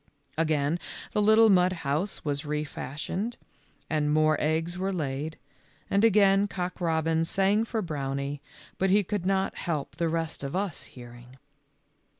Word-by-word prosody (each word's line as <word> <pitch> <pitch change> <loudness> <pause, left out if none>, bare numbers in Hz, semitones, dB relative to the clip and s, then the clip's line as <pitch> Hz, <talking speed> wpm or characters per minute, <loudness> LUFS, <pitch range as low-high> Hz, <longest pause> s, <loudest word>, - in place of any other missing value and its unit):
Again 155 0 +1 0.3
the 210 - +1
little 220 +1 +6
mud 180 -1 +4
house 155 +9 -1
was 145 -1 -1
re 150 0 -2
fashioned 155 - -4 0.5
and 150 -1 0
more 155 0 +4
eggs 160 +3 0
were 190 +2 -1
laid, 155 -2 -3 0.5
and 200 +2 +3
again 200 -2 +5
Cock 180 -1 -4
robin 160 -1 +1
sang 195 +5 +2
for 220 -1 -2
Brownie, 140 -2 -3 0.4
but 190 - +2
he 205 +2 +4
could 195 -1 -2
not 195 0 0
help 155 -6 -3
the 170 -1 +1
rest 165 -2 -2
of 140 +3 -4
us 190 -3 -2
hearing. 120 +1 -13
165 Hz, 150 wpm, -28 LUFS, 150-195 Hz, 0.5 s, little